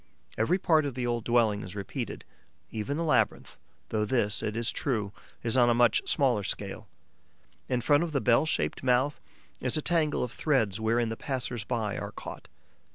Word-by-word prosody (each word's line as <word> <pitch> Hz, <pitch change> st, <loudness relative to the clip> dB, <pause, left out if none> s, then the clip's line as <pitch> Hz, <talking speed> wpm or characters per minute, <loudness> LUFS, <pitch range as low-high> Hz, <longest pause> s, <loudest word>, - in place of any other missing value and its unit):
Every 115 Hz, +12 st, +2 dB
part 160 Hz, -4 st, +3 dB
of 140 Hz, -4 st, -3 dB
the 125 Hz, -1 st, -2 dB
old 120 Hz, -1 st, -1 dB
dwelling 115 Hz, -4 st, +2 dB
is 95 Hz, +1 st, -8 dB
repeated: 100 Hz, -2 st, -5 dB, 0.5 s
even 115 Hz, +7 st, -3 dB
the 165 Hz, -, -1 dB
labyrinth, 155 Hz, -, +1 dB, 0.3 s
though 110 Hz, -1 st, 0 dB
this, 105 Hz, -2 st, +1 dB
it 105 Hz, +1 st, -3 dB
is 115 Hz, 0 st, +1 dB
true, 110 Hz, -8 st, -2 dB, 0.3 s
is 115 Hz, 0 st, 0 dB
on 120 Hz, -2 st, +5 dB
a 120 Hz, -, +3 dB
much 120 Hz, -2 st, +4 dB
smaller 125 Hz, -7 st, +3 dB
scale. 95 Hz, -, -4 dB, 0.8 s
In 125 Hz, -1 st, +1 dB
front 145 Hz, +4 st, +4 dB
of 170 Hz, -, -3 dB
the 140 Hz, -, +1 dB
bell 125 Hz, +5 st, +3 dB
shaped -, -, -1 dB
mouth 130 Hz, +3 st, +1 dB, 0.4 s
is 125 Hz, +3 st, +1 dB
a -, -, 0 dB
tangle 160 Hz, -4 st, +2 dB
of 125 Hz, -, -4 dB
threads 115 Hz, -11 st, +1 dB
wherein 115 Hz, +1 st, +1 dB
the 115 Hz, -, -4 dB
passers 125 Hz, -4 st, -3 dB
by 110 Hz, -3 st, -2 dB
are -, -, -6 dB
caught. -, -, -9 dB
120 Hz, 185 wpm, -29 LUFS, 110-140 Hz, 0.8 s, on